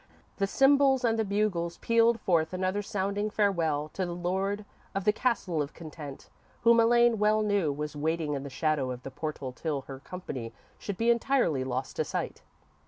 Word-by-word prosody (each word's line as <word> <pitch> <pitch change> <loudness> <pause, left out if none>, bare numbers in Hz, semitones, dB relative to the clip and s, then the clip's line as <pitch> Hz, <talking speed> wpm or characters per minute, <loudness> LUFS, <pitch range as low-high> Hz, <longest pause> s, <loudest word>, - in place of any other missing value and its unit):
The 195 - +1
cymbals 270 +2 +4
and 225 -1 +2
the - - +3
bugles 200 -5 -1
pealed 230 0 +3
forth 165 -4 +1
another 185 +2 0
sounding 200 +1 -2
farewell 170 -8 +1
to 190 - -3
the 175 -1 -3
Lord 190 +4 -1 0.3
of 195 - -1
the 210 +1 +3
Castle 200 -9 0
of 145 +1 -5
Content, 155 -4 -9 0.3
whom 235 0 +6
Elaine 235 -1 +4
well 215 +1 +3
knew 200 -7 +1
was 150 +1 -4
waiting 155 0 -1
in 140 - -2
the 140 - -6
shadow 145 -1 0
of 125 0 -6
the 135 - -7
portal 145 -2 -4
till 145 +2 -3
her 135 0 -9
company 135 -9 -7 0.3
should 200 -3 -5
be 230 +1 +3
entirely 235 - +2
lost 130 0 -4
to - - +2
sight. - - -4
185 Hz, 180 wpm, -29 LUFS, 150-215 Hz, 0.3 s, whom